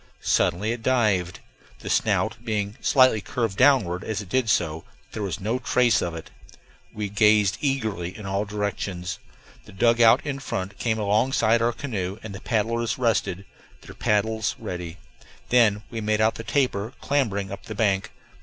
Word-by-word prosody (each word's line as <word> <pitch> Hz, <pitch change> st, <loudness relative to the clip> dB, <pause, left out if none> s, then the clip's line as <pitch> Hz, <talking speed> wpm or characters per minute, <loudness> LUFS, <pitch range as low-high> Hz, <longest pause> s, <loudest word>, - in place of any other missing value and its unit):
Suddenly 105 Hz, +6 st, +1 dB
it 120 Hz, -1 st, -4 dB
dived, 105 Hz, -8 st, +1 dB, 0.4 s
the -, -, -9 dB
snout 115 Hz, -, +1 dB
being 105 Hz, -2 st, -2 dB
slightly 130 Hz, -5 st, +4 dB
curved 115 Hz, -4 st, -2 dB
downward 115 Hz, -9 st, +3 dB
as 110 Hz, -, -3 dB
it 100 Hz, -4 st, -8 dB
did 125 Hz, +1 st, +1 dB
so. 80 Hz, -4 st, 0 dB, 0.3 s
There 110 Hz, -, -5 dB
was 95 Hz, -6 st, -3 dB
no 110 Hz, +6 st, -1 dB
trace 125 Hz, -1 st, +2 dB
of 85 Hz, -1 st, -3 dB
it; 80 Hz, -, -9 dB, 0.6 s
we 105 Hz, -1 st, -4 dB
gazed 105 Hz, -1 st, +3 dB
eagerly 110 Hz, -, -2 dB
in 105 Hz, -, -9 dB
all 100 Hz, +1 st, -1 dB
directions; 100 Hz, -3 st, -4 dB, 0.5 s
the -, -, -14 dB
dugout 115 Hz, +4 st, +4 dB
in 140 Hz, -2 st, -3 dB
front 95 Hz, -6 st, -5 dB
came 110 Hz, -2 st, 0 dB
alongside 110 Hz, +2 st, +2 dB
our 115 Hz, +1 st, +2 dB
canoe 100 Hz, -7 st, -4 dB
and 110 Hz, -2 st, -7 dB
the 100 Hz, -, -8 dB
paddlers 115 Hz, +1 st, -1 dB
rested, 105 Hz, -6 st, 0 dB, 0.4 s
their -, -, -12 dB
paddles 110 Hz, +1 st, 0 dB
ready. 90 Hz, -1 st, -6 dB, 0.5 s
Then 110 Hz, -4 st, +4 dB
we 115 Hz, -1 st, -4 dB
made 105 Hz, 0 st, 0 dB
out 110 Hz, +1 st, +3 dB
the 115 Hz, -, -8 dB
tapir 120 Hz, -4 st, 0 dB
clambering 105 Hz, -9 st, -1 dB
up 100 Hz, -, -8 dB
the 110 Hz, -, -6 dB
bank. 100 Hz, -3 st, +1 dB
110 Hz, 165 wpm, -24 LUFS, 100-115 Hz, 0.6 s, slightly